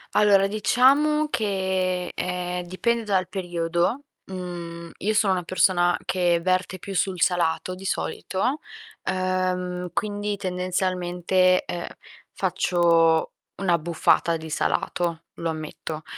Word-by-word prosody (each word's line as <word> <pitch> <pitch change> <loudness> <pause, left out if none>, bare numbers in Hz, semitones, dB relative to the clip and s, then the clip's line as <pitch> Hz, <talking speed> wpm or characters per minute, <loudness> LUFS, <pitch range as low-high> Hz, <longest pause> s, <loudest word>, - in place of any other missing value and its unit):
Allora 200 -2 +5
diciamo 270 +9 +3
che, 190 -5 -1
ehm, 180 0 -3
dipende 230 +6 0
dal 190 -4 +1
periodo, 175 +4 -1 0.2
mhmm, 170 -2 -7
io 215 +3 0
sono 205 -2 +3
una 180 - -1
persona 175 0 +2
che 175 -2 +2
verte 185 +1 0
più 195 +2 -7
sul 185 -1 0
salato 175 0 +1
di 185 +1 -10
solito, 195 +7 -2 0.4
ehm, 185 -1 -1
quindi 205 +2 -2
tendenzialmente, 185 -1 +1
ehm, 175 0 -4 0.4
faccio 165 -2 +2 0.2
un'abbuffata 170 -2 +2
di 160 0 -9
salato, 170 +1 -1
lo 165 - -2
ammetto. 155 0 -6
185 Hz, 110 wpm, -24 LUFS, 175-195 Hz, 0.4 s, Allora